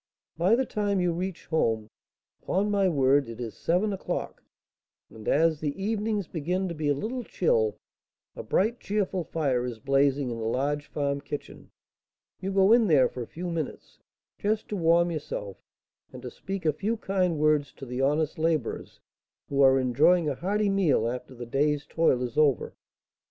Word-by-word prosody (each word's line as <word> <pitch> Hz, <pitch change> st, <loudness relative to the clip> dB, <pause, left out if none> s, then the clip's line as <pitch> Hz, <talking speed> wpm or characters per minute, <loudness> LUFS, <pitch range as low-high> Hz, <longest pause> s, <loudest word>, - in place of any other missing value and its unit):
By 180 Hz, +7 st, +3 dB
the 260 Hz, +2 st, +1 dB
time 205 Hz, -3 st, -1 dB
you 180 Hz, -1 st, +1 dB
reach 185 Hz, +1 st, -4 dB
home, 115 Hz, -9 st, 0 dB, 0.5 s
upon 205 Hz, +3 st, 0 dB
my 200 Hz, -2 st, +3 dB
word, 140 Hz, -3 st, +3 dB
it 115 Hz, 0 st, -8 dB
is 115 Hz, -3 st, -5 dB
seven 190 Hz, +5 st, 0 dB
o'clock; 190 Hz, -, -4 dB, 0.7 s
and, 110 Hz, -1 st, -11 dB
as 160 Hz, +1 st, +3 dB
the 150 Hz, +3 st, -3 dB
evenings 210 Hz, -1 st, -1 dB
begin 180 Hz, +4 st, -2 dB
to -, -, -4 dB
be 155 Hz, -2 st, -3 dB
a 145 Hz, -, +3 dB
little 240 Hz, -, -4 dB
chill, 460 Hz, -, +1 dB, 0.6 s
a -, -, -5 dB
bright, 225 Hz, +5 st, 0 dB
cheerful 195 Hz, -3 st, -1 dB
fire 140 Hz, -7 st, -1 dB
is 125 Hz, -2 st, -4 dB
blazing 135 Hz, +2 st, +1 dB
in 115 Hz, -, -5 dB
the -, -, -4 dB
large 145 Hz, +5 st, -1 dB
farm 140 Hz, -1 st, -2 dB
kitchen; 145 Hz, +1 st, -8 dB, 0.7 s
you 195 Hz, +1 st, -3 dB
go 195 Hz, +1 st, +4 dB
in 235 Hz, -2 st, +5 dB
there 145 Hz, -7 st, +5 dB
for 125 Hz, -, -7 dB
a 115 Hz, -, -5 dB
few 175 Hz, +1 st, -5 dB
minutes, 160 Hz, -4 st, -5 dB, 0.4 s
just 215 Hz, +1 st, -1 dB
to 210 Hz, -, -2 dB
warm 170 Hz, -1 st, +3 dB
yourself 105 Hz, -, -5 dB, 0.5 s
and 125 Hz, 0 st, -10 dB
to 125 Hz, -, -6 dB
speak 195 Hz, -2 st, -6 dB
a 155 Hz, -, +3 dB
few 210 Hz, +9 st, -2 dB
kind 185 Hz, -5 st, 0 dB
words 150 Hz, -2 st, +2 dB
to 135 Hz, -, -10 dB
the 125 Hz, +1 st, -4 dB
honest 150 Hz, +3 st, +1 dB
labourers, 160 Hz, -6 st, -1 dB, 0.5 s
who 140 Hz, 0 st, +1 dB
are 135 Hz, -1 st, +6 dB
enjoying 150 Hz, +7 st, +3 dB
a 145 Hz, -, +1 dB
hearty 205 Hz, +8 st, 0 dB
meal 165 Hz, -, +2 dB
after 125 Hz, +2 st, -5 dB
the 120 Hz, 0 st, -7 dB
day's 145 Hz, +4 st, 0 dB
toil 145 Hz, -6 st, +2 dB
is 125 Hz, +3 st, -2 dB
over. 145 Hz, -5 st, +2 dB
155 Hz, 180 wpm, -27 LUFS, 135-190 Hz, 0.7 s, are